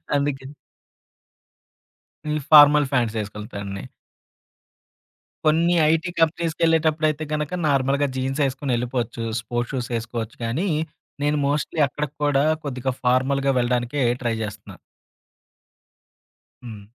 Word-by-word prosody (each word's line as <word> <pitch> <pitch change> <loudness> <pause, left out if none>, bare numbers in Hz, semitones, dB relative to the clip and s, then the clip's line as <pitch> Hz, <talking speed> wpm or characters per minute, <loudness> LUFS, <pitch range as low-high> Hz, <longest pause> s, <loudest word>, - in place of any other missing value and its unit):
అందుకే 140 -2 -1 1.9
ఈ - - 0 0.2
ఫార్మల్ 145 -1 +8
ఫ్యాంట్సేసుకెళ్తాండి. 105 -4 -3 1.6
కొన్ని 165 +3 +3 0.2
ఐటీ 165 +2 0
కంపెనీస్‌కెళ్ళేటప్పుడైతే 160 -1 +1
గనక 150 +3 -2
నార్మల్‌గా 140 +1 +2
జీన్స్ 135 +3 -2
ఏసుకొనెళ్ళిపోవచ్చు. 125 -3 -2 0.2
స్పోర్ట్స్ 120 +3 -4
షూస్ 125 -2 -3
ఏసుకోవచ్చు 115 -1 -6
కానీ, 155 +13 -1 0.6
నేను 150 +1 +1
మోస్ట్‌లీ 150 +2 -1
అక్కడికి 150 +1 -5
కూడా 145 -1 +3 0.2
కొద్దిగా 130 -1 -2
ఫార్మల్‌గా 135 +2 +2
వెళ్ళడానికే 125 +3 0 0.2
ట్రై 115 -1 0
జేస్తున్నా. 105 -1 -8 1.9
హ్మ్. 110 -4 -9
135 Hz, 90 wpm, -23 LUFS, 120-150 Hz, 1.9 s, ఫార్మల్